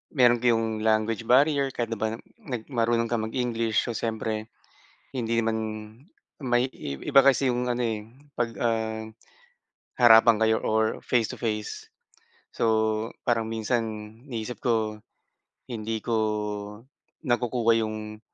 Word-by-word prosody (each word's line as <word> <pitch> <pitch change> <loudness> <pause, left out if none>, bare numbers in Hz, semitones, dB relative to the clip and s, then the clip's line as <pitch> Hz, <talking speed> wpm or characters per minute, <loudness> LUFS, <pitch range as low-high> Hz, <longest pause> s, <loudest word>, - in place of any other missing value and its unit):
meron 120 -3 +5
kayong 115 -2 +1
language 110 +1 +1
barrier. 140 +2 +4
Kahit 115 -1 -2
na 115 - -3
ba 110 0 -1
na - - -13 0.5
marunong 115 -1 +1
kang 110 -2 0
mag 110 - -9
English. 115 -3 0
So 120 - -3
siyempre 110 -1 -3 0.7
hindi 115 -2 -1
naman, 115 -1 +1 0.9
may 120 0 +2
iba 135 - +2
kasi 135 -1 +4
yung 125 0 -1
ano, 120 +1 0
eh, 110 -2 -2 0.3
pag, 120 -1 +1
um, 110 -1 -1 0.9
harapan 115 -1 +7
kayo 110 0 +3
or 110 0 +1
face 115 -4 +1
to - - -7
face. 105 -3 -4 0.6
So - - -1 0.6
parang 115 -2 +2
minsan 115 +2 0 0.4
iniisip 120 -2 -5
ko, 110 -3 0 0.7
hindi 110 -2 -3
ko 115 - 0 1.1
nakukuha 120 -3 +2
yung 110 0 -5
115 Hz, 130 wpm, -26 LUFS, 110-120 Hz, 1.1 s, harapan